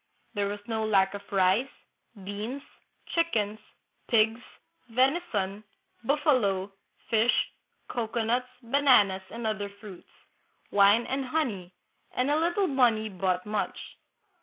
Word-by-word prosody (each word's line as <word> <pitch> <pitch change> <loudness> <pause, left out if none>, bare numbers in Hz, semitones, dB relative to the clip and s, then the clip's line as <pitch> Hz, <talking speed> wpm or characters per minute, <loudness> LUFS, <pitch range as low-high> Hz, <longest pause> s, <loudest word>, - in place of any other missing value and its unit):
There 205 -2 0
was 205 +1 -4
no 220 -1 -1
lack 195 -3 +3
of 200 - -9
rice, 195 +6 +3 0.5
beans, 215 +8 -5 0.4
chickens, 220 -11 0 0.5
pigs, 225 0 +3 0.5
venison, 230 - 0 0.4
buffalo, 230 - +1 0.4
fish, 225 +2 +3 0.4
cocoanuts, 235 +1 -1
bananas, 235 -7 +4
and 235 0 -6
other 205 -2 -2
fruits, 200 -2 -13 0.6
wine 205 +3 +5
and 270 0 -2
honey; 245 - -2 0.4
and 255 +3 +1
a 300 - +3
little 345 +4 +1
money 240 -8 +2
bought 185 -2 -1
much. 210 0 -2
220 Hz, 110 wpm, -28 LUFS, 200-255 Hz, 0.6 s, wine